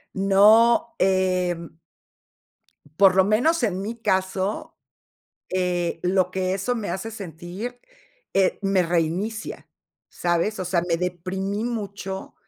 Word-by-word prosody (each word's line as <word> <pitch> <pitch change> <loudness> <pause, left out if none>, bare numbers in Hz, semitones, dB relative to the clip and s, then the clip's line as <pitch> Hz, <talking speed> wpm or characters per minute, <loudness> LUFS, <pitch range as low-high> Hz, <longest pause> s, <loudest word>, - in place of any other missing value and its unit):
No, 215 +5 +5
em, 185 -3 0 1.2
por 195 -2 +6
lo 190 - +6
menos 250 +10 +2
en 190 -4 0
mí 220 +4 -4
caso, 190 - -1 0.7
eh, 180 -2 -1
lo 185 0 +2
que 185 0 -1
eso 200 +6 -1
me 215 -6 -4
hace 190 +5 -4
sentir, 195 +5 -7 0.5
eh, 195 -1 +2
me 195 -2 +2
reinicia, 175 +6 -2 0.4
¿sabes?, 175 +5 -1
o 185 - -2
sea, 175 -1 +1
me 165 - +2
deprimí 185 +4 -3
mucho, 200 -4 -5
190 Hz, 115 wpm, -24 LUFS, 180-210 Hz, 1.2 s, por